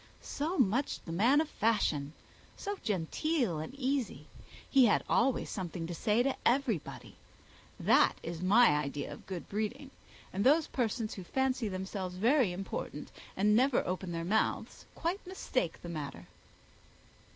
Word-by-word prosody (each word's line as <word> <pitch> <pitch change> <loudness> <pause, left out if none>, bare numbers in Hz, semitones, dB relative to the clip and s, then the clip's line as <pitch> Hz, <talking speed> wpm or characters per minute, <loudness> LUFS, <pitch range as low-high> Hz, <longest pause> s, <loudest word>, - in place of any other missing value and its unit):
so 315 +6 -3
much 255 +3 +1
the 165 - -6
man 235 - +4
of 315 - +1
fashion! 160 - 0 0.4
so 405 0 -3
genteel 210 - 0
and 155 - -5
so - - -13
easy! 270 -2 -1 0.4
He 270 -3 +6
has 210 - +3
always 260 +2 +2
something 175 -3 -4
to 175 - -5
say 220 +6 +2
to 270 0 0
everybody. 240 - -1 0.6
That - - +4
is 170 0 -5
my 215 +6 +6
idea 145 -1 -1
of - - -13
good 185 -3 -6
breeding; 245 +7 -3 0.4
and 195 +2 0
those 300 +5 +5
persons 230 -3 -2
who 190 - -7
fancy 260 +3 0
themselves 190 -1 -4
very 235 +2 +3
important 190 +2 -5 0.3
and 210 +2 +4
never 255 +2 +3
open 185 0 -3
their 165 0 -3
mouths 220 +5 -1
quite 350 +5 -2
mistake 255 - -2
the - - -6
matter." 145 - -6
215 Hz, 150 wpm, -32 LUFS, 180-265 Hz, 0.6 s, He